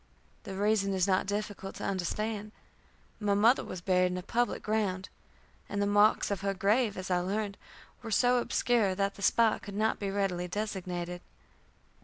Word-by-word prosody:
The 195 Hz, -2 st, -6 dB
reason 200 Hz, -1 st, +1 dB
is 185 Hz, 0 st, +2 dB
not 190 Hz, 0 st, +2 dB
difficult 205 Hz, -1 st, -4 dB
to -, -, -7 dB
understand. 210 Hz, +3 st, -2 dB, 0.7 s
My 205 Hz, -2 st, +1 dB
mother 225 Hz, +6 st, +4 dB
was 185 Hz, -, -7 dB
buried 180 Hz, 0 st, +3 dB
in 180 Hz, -, -3 dB
a 180 Hz, -, -5 dB
public 240 Hz, +5 st, -1 dB
ground, 200 Hz, -3 st, -1 dB, 0.6 s
and 200 Hz, -, -2 dB
the 200 Hz, -, +2 dB
marks 205 Hz, +1 st, +3 dB
of 200 Hz, -, -2 dB
her 195 Hz, 0 st, -1 dB
grave, 210 Hz, +2 st, +2 dB
as 185 Hz, 0 st, -5 dB
I 180 Hz, -, +3 dB
learned, 200 Hz, +3 st, -2 dB, 0.5 s
were 230 Hz, -, -7 dB
so 245 Hz, +3 st, +3 dB
obscure 235 Hz, -5 st, +1 dB
that 200 Hz, +1 st, 0 dB
the -, -, -13 dB
spot 225 Hz, +2 st, +3 dB
could 200 Hz, -, -8 dB
not 220 Hz, +2 st, +1 dB
be 200 Hz, -, -2 dB
readily 195 Hz, -3 st, -1 dB
designated. 180 Hz, -3 st, -4 dB
200 Hz, 175 wpm, -30 LUFS, 185-215 Hz, 0.7 s, mother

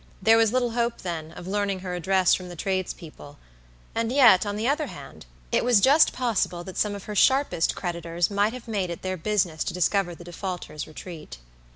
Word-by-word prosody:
There 220 Hz, +3 st, +5 dB
was 225 Hz, -2 st, +3 dB
little 245 Hz, -1 st, +1 dB
hope, 235 Hz, 0 st, -1 dB
then, 160 Hz, -3 st, -5 dB
of 175 Hz, -, -10 dB
learning 200 Hz, 0 st, -1 dB
her 180 Hz, -1 st, -5 dB
address 185 Hz, +1 st, +2 dB
from 185 Hz, -1 st, -2 dB
the 175 Hz, -, -8 dB
tradespeople; 170 Hz, -5 st, -5 dB, 0.6 s
and 230 Hz, 0 st, -1 dB
yet, 245 Hz, -8 st, +6 dB
on 205 Hz, -, -2 dB
the 220 Hz, +3 st, -1 dB
other 295 Hz, +2 st, 0 dB
hand, 135 Hz, -, -11 dB, 0.2 s
it -, -, +2 dB
was 240 Hz, -3 st, +5 dB
just 280 Hz, +9 st, +5 dB
possible 220 Hz, -8 st, -1 dB
that 190 Hz, +1 st, -9 dB
some 210 Hz, -1 st, 0 dB
of 200 Hz, -, -8 dB
her 210 Hz, -, -6 dB
sharpest 260 Hz, -, +2 dB
creditors 170 Hz, 0 st, -2 dB
might 205 Hz, +2 st, +1 dB
have 250 Hz, -1 st, -9 dB
made 200 Hz, -5 st, -2 dB
it 170 Hz, -, -7 dB
their 185 Hz, 0 st, -2 dB
business 175 Hz, -3 st, 0 dB
to 175 Hz, -, -3 dB
discover 180 Hz, 0 st, +1 dB
the 175 Hz, -, -12 dB
defaulter's 175 Hz, -3 st, -6 dB
retreat. 155 Hz, -, -9 dB
190 Hz, 200 wpm, -25 LUFS, 175-225 Hz, 0.6 s, yet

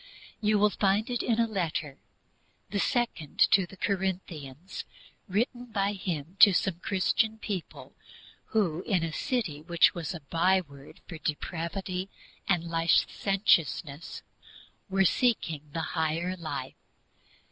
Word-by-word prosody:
You 215 Hz, 0 st, +3 dB
will 210 Hz, +1 st, +4 dB
find 205 Hz, +4 st, +1 dB
it 245 Hz, -, 0 dB
in 230 Hz, -1 st, +1 dB
a 230 Hz, -, +4 dB
letter 165 Hz, -9 st, -3 dB, 0.7 s
the 200 Hz, -, 0 dB
second 235 Hz, -, -1 dB
to 190 Hz, -2 st, +5 dB
the 195 Hz, -, -13 dB
Corinthians 180 Hz, -6 st, -3 dB, 0.4 s
written 240 Hz, +5 st, -1 dB
by 205 Hz, -3 st, 0 dB
him 175 Hz, -3 st, -4 dB
to 200 Hz, -2 st, +9 dB
some 180 Hz, -3 st, 0 dB
Christian 205 Hz, +4 st, +1 dB
people 200 Hz, -5 st, -6 dB, 0.5 s
who, 180 Hz, -7 st, 0 dB
in 185 Hz, -5 st, +2 dB
a 165 Hz, -1 st, -3 dB
city 210 Hz, -, -2 dB
which 170 Hz, +1 st, +4 dB
was 170 Hz, 0 st, -4 dB
a 165 Hz, -, -7 dB
byword 165 Hz, -2 st, -1 dB
for 165 Hz, -, -8 dB
depravity 180 Hz, +5 st, -3 dB, 0.4 s
and 175 Hz, -3 st, +3 dB
licentiousness, 165 Hz, -1 st, +1 dB, 0.7 s
were 195 Hz, 0 st, +3 dB
seeking 165 Hz, -, +1 dB
the 165 Hz, -, -2 dB
higher 165 Hz, +3 st, 0 dB
life. 170 Hz, -3 st, -5 dB
185 Hz, 125 wpm, -29 LUFS, 165-200 Hz, 0.7 s, to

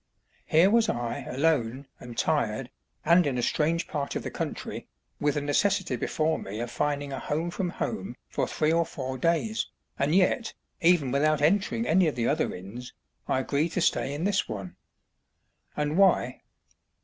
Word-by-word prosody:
Here 170 Hz, +5 st, +5 dB
was 230 Hz, 0 st, +4 dB
I 120 Hz, -1 st, -2 dB
alone, 135 Hz, -3 st, 0 dB
and 120 Hz, -1 st, -10 dB
tired, 125 Hz, -5 st, 0 dB, 0.3 s
and 170 Hz, 0 st, +5 dB
in 130 Hz, -3 st, -1 dB
a 120 Hz, -, -1 dB
strange 165 Hz, +5 st, +1 dB
part 140 Hz, -2 st, -3 dB
of -, -, -2 dB
the -, -, -4 dB
country, -, -, -5 dB, 0.3 s
with 145 Hz, -1 st, +1 dB
the 150 Hz, -, 0 dB
necessity 145 Hz, +1 st, +1 dB
before 155 Hz, +6 st, 0 dB
me 100 Hz, +3 st, -6 dB
of 120 Hz, 0 st, -4 dB
finding 145 Hz, 0 st, -1 dB
"a 135 Hz, -, -3 dB
home 160 Hz, +4 st, -2 dB
from 180 Hz, 0 st, -2 dB
home" -, -, -4 dB
for -, -, -1 dB
three 155 Hz, +1 st, +1 dB
or 170 Hz, 0 st, +3 dB
four 130 Hz, -4 st, -5 dB
days, 170 Hz, -, +1 dB, 0.3 s
and 145 Hz, +4 st, +2 dB
yet, 195 Hz, +5 st, +2 dB, 0.3 s
even 165 Hz, -6 st, +4 dB
without 150 Hz, +2 st, +2 dB
entering 200 Hz, +9 st, +2 dB
any 180 Hz, -2 st, +4 dB
of 155 Hz, -, -1 dB
the 120 Hz, -2 st, 0 dB
other 155 Hz, +2 st, +1 dB
inns, 100 Hz, +8 st, -9 dB, 0.3 s
I 130 Hz, -, +1 dB
agreed 145 Hz, +5 st, 0 dB
to 185 Hz, -, 0 dB
stay 140 Hz, -, +1 dB
in 155 Hz, -, -3 dB
this 200 Hz, +1 st, +1 dB
one. 100 Hz, -5 st, -6 dB, 1.0 s
And 150 Hz, +4 st, 0 dB
why? 180 Hz, -10 st, +3 dB
150 Hz, 175 wpm, -27 LUFS, 130-170 Hz, 1.0 s, Here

